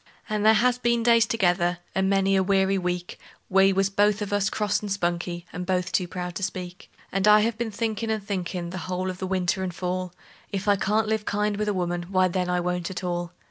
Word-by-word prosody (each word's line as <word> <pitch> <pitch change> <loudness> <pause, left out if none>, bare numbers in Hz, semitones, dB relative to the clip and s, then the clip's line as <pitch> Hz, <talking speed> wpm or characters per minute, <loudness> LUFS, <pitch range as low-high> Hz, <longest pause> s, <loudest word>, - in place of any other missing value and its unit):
And 215 -1 -1
there 220 +1 +6
has 245 +3 +2
been 235 -1 +1
days 230 -1 +5
together 180 -5 +1 0.2
and 190 0 +1
many 195 0 +3
a 190 - +4
weary 195 0 +2
week 180 -1 -3 0.3
We 195 0 +5
was 195 +1 +1
both 205 +1 +2
of 205 - -4
us 205 0 +2
cross 210 -1 0
and 205 -1 -5
spunky, 175 -2 -2
and 180 - -4
both 180 0 -1
too 180 - +1
proud 180 0 -5
to - - -6
speak; 180 -2 -5 0.2
And 195 +1 +1
I 210 0 +7
have 225 +1 0
been 235 0 -3
thinkin' 220 +1 -2
and 220 -2 -1
thinkin', 180 -3 -3
the 185 - -5
whole 185 +1 -1
of 185 - -10
the 190 - -3
winter 190 0 0
and 185 -1 -2
fall, 185 0 -3 0.4
If 200 0 -3
I 205 - +5
can't 210 +2 +1
live 220 -1 -1
kind 210 0 0
with 210 +1 -2
a 210 - +1
woman, 175 -1 -2
why, 185 -1 +3
then, 180 0 -1
I 180 0 +1
won't 180 -1 -2
at 190 0 -6
all. 175 -1 -3
190 Hz, 235 wpm, -25 LUFS, 180-210 Hz, 0.4 s, I